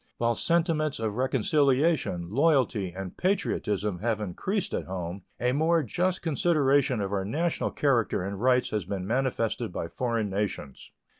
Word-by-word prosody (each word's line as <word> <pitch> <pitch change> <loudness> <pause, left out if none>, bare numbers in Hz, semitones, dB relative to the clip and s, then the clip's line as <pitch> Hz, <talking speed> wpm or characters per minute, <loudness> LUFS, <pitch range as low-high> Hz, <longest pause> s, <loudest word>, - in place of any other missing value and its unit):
While 120 0 +2
sentiments 160 0 +1
of 110 -2 -1
reconciliation, 135 - +1
loyalty, 130 - +2
and 95 0 -7
patriotism 105 - -1
have 110 +1 0
increased 170 - -2
at - - -2
home, 90 0 -5
a 125 +1 +1
more 160 +4 +2
just 180 - -1
consideration 140 -6 +2
of 100 0 -3
our 95 -1 0
national 160 - -1
character 120 -9 +1
and 100 +1 -5
rights 125 0 +3
has 105 -2 -1
been 95 -1 -4
manifested 120 -2 -1
by 85 - -4
foreign 115 -5 -1
nations. 95 -9 -4
120 Hz, 145 wpm, -27 LUFS, 100-150 Hz, -, rights